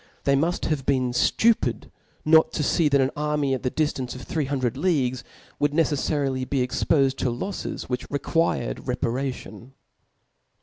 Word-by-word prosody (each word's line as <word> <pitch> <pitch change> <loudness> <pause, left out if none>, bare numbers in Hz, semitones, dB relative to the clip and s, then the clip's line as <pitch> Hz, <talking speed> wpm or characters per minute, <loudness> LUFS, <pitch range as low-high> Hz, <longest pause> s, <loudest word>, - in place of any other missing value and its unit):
They 140 - +3
mull: 165 +6 +1
have 150 -3 -1
been 130 -3 +2
ftupid 225 - +1 0.3
not 160 +1 +5
to 150 - -1
fee, 155 +2 +2
that 140 -1 +3
an 135 +1 +2
army 150 -2 0
at 130 - -2
the 125 - 0
diftance 135 -4 -2
of 130 - -8
three 155 -3 -2
hundred 130 -3 -1
leagues 135 -6 0 0.4
would 145 0 +1
necefliarily 140 -4 0
be 130 -3 +1
expofed 135 +1 +1
to 130 - 0
lofies^ 150 +12 -4
yirhich 125 0 -4
required 165 +4 0
repar^tioq. 125 0 -4
140 Hz, 150 wpm, -24 LUFS, 130-150 Hz, 0.4 s, not